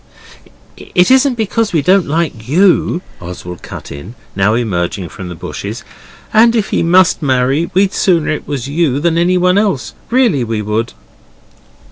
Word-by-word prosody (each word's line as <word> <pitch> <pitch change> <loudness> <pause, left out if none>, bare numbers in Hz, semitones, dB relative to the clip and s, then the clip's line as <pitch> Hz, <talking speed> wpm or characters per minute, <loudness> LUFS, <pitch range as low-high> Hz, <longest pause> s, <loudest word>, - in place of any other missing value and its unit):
'It 180 +6 +1
isn't 265 0 +4
because 225 -1 -1
we 160 - +2
don't 185 +2 +3
like 145 -8 -2
YOU,' 180 +3 +2 0.2
Oswald 90 0 -8
cut - - -9
in, 70 - -9 0.2
now 100 +3 +2
emerging 95 -5 -2
from 90 +1 -8
the 90 - -7
bushes, - - -6 0.5
'and 230 +2 +5
if 220 -4 0
he - - +1
must 180 +2 +3
marry, 135 +3 +1
we'd 195 0 +2
sooner 170 -6 +1
it 155 - -4
was 135 -3 -4
you 145 -2 0
than 165 +2 +1
anyone. 180 +2 +2 0.5
Really 235 - +2
we 110 -2 -3
would. 110 +3 -2
155 Hz, 150 wpm, -14 LUFS, 115-185 Hz, 0.5 s, and